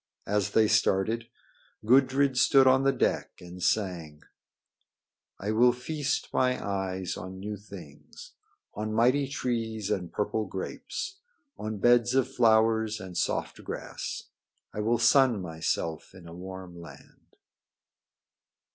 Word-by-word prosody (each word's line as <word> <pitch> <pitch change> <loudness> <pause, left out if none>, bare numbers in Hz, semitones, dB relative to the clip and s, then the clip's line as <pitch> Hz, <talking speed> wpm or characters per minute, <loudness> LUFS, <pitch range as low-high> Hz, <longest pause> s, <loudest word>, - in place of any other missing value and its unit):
As 100 -1 -1
they 110 -1 +5
started, 110 +1 +1 0.6
Gudrid 130 +2 +4
stood 135 +2 +5
on 130 0 +5
the 135 - +4
deck - - -1
and 90 +1 -11
sang: 90 -6 -1 1.1
"I 100 +2 -3
will 120 +3 +5
feast 145 +4 -3
my 125 0 +2
eyes 95 -2 -3
on 95 0 -8
new 105 +2 -5
things 90 -8 -12 0.4
On 110 0 -4
mighty 130 +5 +3
trees 115 -6 -3
and 90 -4 -2
purple 105 0 -2
grapes, 385 - -6 0.4
On 110 0 -4
beds 120 +3 +3
of 135 0 +1
flowers 110 -2 +3
and 95 -3 -9
soft - - -2
grass. - - -6 0.4
I - - -5
will 115 +3 +1
sun 125 -1 +4
myself 80 0 -3
in 90 -3 -13
a 85 - -10
warm 90 -1 -9
land." 85 - -15
110 Hz, 125 wpm, -28 LUFS, 95-125 Hz, 1.1 s, they